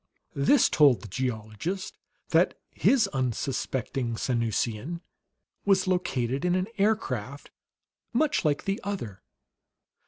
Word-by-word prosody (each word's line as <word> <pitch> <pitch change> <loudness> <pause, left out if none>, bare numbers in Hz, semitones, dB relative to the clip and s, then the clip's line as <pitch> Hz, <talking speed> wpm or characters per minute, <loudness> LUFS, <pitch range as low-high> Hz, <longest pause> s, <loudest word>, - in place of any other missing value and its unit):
This 140 - +4
told 145 -6 +5
the - - -7
geologist 120 - -3 0.3
that - - +3
his 250 -6 +3
unsuspecting 130 - -2
Sanusian 115 +6 -1 0.6
was 195 -2 +3
located 135 -8 0
in 180 0 +2
an 185 0 +1
aircraft 215 +2 -1 0.6
much 295 +5 +1
like 150 -3 0
the 195 +1 -1
other. 120 - -5
140 Hz, 100 wpm, -27 LUFS, 120-190 Hz, 0.6 s, told